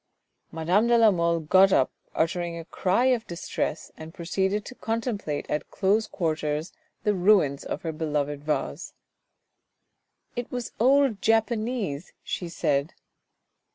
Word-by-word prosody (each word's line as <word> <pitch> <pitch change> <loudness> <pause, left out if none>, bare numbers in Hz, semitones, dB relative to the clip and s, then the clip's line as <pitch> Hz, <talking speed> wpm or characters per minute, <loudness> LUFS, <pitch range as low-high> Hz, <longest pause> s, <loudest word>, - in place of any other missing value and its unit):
Madame 175 +8 +2
de 240 0 +5
la 225 -2 +6
Mole 170 -2 +1
got 190 +5 +5
up, 130 - +3 0.2
uttering 170 +1 -1
a 165 - -7
cry 190 +8 +1
of 250 -3 +2
distress, 170 -2 -3
and 160 +2 -10
proceeded 190 +4 -1
to - - -8
contemplate 225 - -3
at 150 - -3
close 210 +3 +1
quarters 155 -1 -2 0.3
the 210 - +2
ruins 180 -7 +3
of - - -5
her 165 - -2
beloved 150 -2 -2
vase. 150 0 -3 0.7
" - - -49
It 245 -1 -4
was 245 -1 -4
old 265 -2 +4
Japanese," 225 - 0
she 175 - -4
said. 150 -2 0
180 Hz, 135 wpm, -26 LUFS, 160-220 Hz, 0.7 s, la